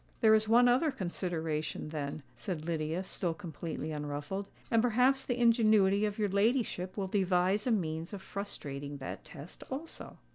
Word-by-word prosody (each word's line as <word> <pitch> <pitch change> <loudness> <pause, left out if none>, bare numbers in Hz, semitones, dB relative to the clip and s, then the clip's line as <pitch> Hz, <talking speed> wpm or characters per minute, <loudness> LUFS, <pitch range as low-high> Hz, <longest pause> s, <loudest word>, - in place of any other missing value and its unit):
"There 220 -1 +7
is 215 0 +3
one 240 +2 +6
other 255 +6 +4
consideration, 165 - -3
then," 150 -1 -4
said 155 +7 -4
Lydia, 165 +1 -1
still 175 -3 -2
completely 160 -3 -5
unruffled: 150 +6 -4 0.2
"and 230 -1 +5
perhaps 250 +3 +3
the 245 - -2
ingenuity 215 -4 +4
of 210 -1 -2
your 210 -2 +1
ladyship 200 -2 +1
will 195 - 0
devise 190 +2 +1
a - - +3
means 165 -5 -1
of 200 -2 -7
frustrating 145 -8 -6
that 135 - -6
test 150 +3 -11
also." 290 +5 -7
190 Hz, 155 wpm, -32 LUFS, 160-220 Hz, 0.2 s, There